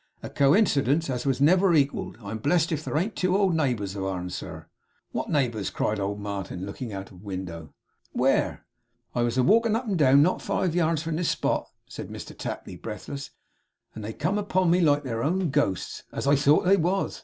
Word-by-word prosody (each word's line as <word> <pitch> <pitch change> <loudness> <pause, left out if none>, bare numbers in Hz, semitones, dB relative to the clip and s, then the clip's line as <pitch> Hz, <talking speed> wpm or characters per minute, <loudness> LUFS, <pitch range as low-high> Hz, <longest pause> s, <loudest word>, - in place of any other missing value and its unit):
'A - - -6
coincidence 140 - +3
as 125 +1 -1
never 185 +7 +5
was 170 - +5
equalled! 140 -4 0
I'm 105 +2 -5
blessed 160 +7 +2
if 155 -1 -2
here - - -1
ain't 200 +7 -1
two 185 +1 +1
old 195 -3 +2
neighbours 120 -10 -1
of 95 - -3
ourn, 90 -2 -3
sir!' - - -7 0.5
'What - - -3
neighbours?' 120 -8 0
cried 105 0 -1
old 100 +1 -2
Martin, 100 -3 -5
looking 110 +4 -6
out 95 -1 -7
of 90 -2 -14
window. 90 -5 -6 0.4
'Where?' - - +1 0.5
'I 120 - 0
was 120 +1 0
a 130 - +4
walkin' 225 - +4
up 240 +3 -2
and 195 -6 -1
down 140 0 +6
not 180 - +1
five 180 -4 -1
yards 165 -2 +1
from 165 -1 -2
this 175 -1 0
spot,' - - -1 0.2
said - - -8
Mr - - -8
Tapley, - - -6
breathless, 140 +7 -7 0.6
'and 110 - -8
they 105 - -4
come 180 - -1
upon 185 -4 +1
me 180 +1 +4
like 145 -3 +3
their 115 -4 -3
own 175 +3 0
ghosts, 115 -11 -1
as - - -4
I 140 +1 +5
thought 145 +3 +4
they 195 +2 +5
was! 185 +3 0
140 Hz, 200 wpm, -26 LUFS, 105-175 Hz, 0.6 s, down